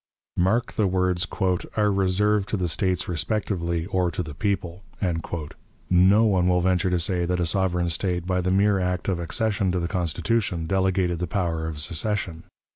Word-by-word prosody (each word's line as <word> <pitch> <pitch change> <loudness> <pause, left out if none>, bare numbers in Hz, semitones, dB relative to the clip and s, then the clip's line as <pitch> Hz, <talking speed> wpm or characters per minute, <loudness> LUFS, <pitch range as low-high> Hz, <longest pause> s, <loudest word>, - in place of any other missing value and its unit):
Mark 110 +8 +1
the 105 - +1
words, 90 -2 0 0.5
"are 105 -1 +3
reserved 100 +1 +1
to 105 - -1
the 90 -2 -1
States 95 +2 0
respectively, 85 -2 -1
or 95 -2 0
to 90 +2 -3
the 75 -2 -8
people." 90 0 -2 1.1
No 95 +5 +5
one 95 -5 +2
will 90 0 +3
venture 90 +1 +1
to 90 -1 +1
say 90 0 0
that 90 +1 -1
a 85 - +1
sovereign 90 -1 +1
State, 90 0 -1
by 90 0 0
the 90 - -1
mere 100 +1 +3
act 90 0 -2
of 95 -3 0
accession 100 +3 0
to 90 - 0
the 85 - -2
Constitution, 90 0 -1
delegated 95 -1 +1
the 90 - -2
power 85 -3 -1
of 80 -2 -5
secession. 85 +2 -1
90 Hz, 175 wpm, -24 LUFS, 85-100 Hz, 1.1 s, No